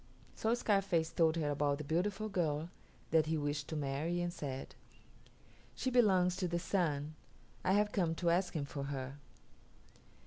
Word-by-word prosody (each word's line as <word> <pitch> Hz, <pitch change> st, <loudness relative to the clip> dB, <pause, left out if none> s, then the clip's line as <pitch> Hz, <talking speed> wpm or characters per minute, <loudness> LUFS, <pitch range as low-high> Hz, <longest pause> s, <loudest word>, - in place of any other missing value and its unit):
So 225 Hz, +2 st, +1 dB
Scarface 195 Hz, -8 st, +1 dB
told 160 Hz, -1 st, +3 dB
her 150 Hz, -3 st, 0 dB
about 145 Hz, 0 st, +1 dB
the 150 Hz, -, -5 dB
beautiful 190 Hz, +8 st, 0 dB
girl 165 Hz, -5 st, -1 dB, 0.4 s
that 160 Hz, -2 st, +4 dB
he 160 Hz, 0 st, +1 dB
wished 145 Hz, -1 st, -2 dB
to 160 Hz, -, -4 dB
marry 150 Hz, +4 st, -1 dB
and 175 Hz, 0 st, -1 dB
said, 135 Hz, -5 st, -5 dB, 1.0 s
"She 260 Hz, -, -1 dB
belongs 190 Hz, -7 st, +4 dB
to 185 Hz, -, 0 dB
the 170 Hz, 0 st, -1 dB
Sun. 155 Hz, -5 st, 0 dB, 0.5 s
I 185 Hz, -, +3 dB
have 210 Hz, +1 st, +3 dB
come 170 Hz, -5 st, +1 dB
to 170 Hz, 0 st, +1 dB
ask 180 Hz, +1 st, +1 dB
him 145 Hz, -3 st, -1 dB
for 140 Hz, 0 st, -5 dB
her." 135 Hz, 0 st, -5 dB
165 Hz, 165 wpm, -35 LUFS, 145-185 Hz, 1.0 s, that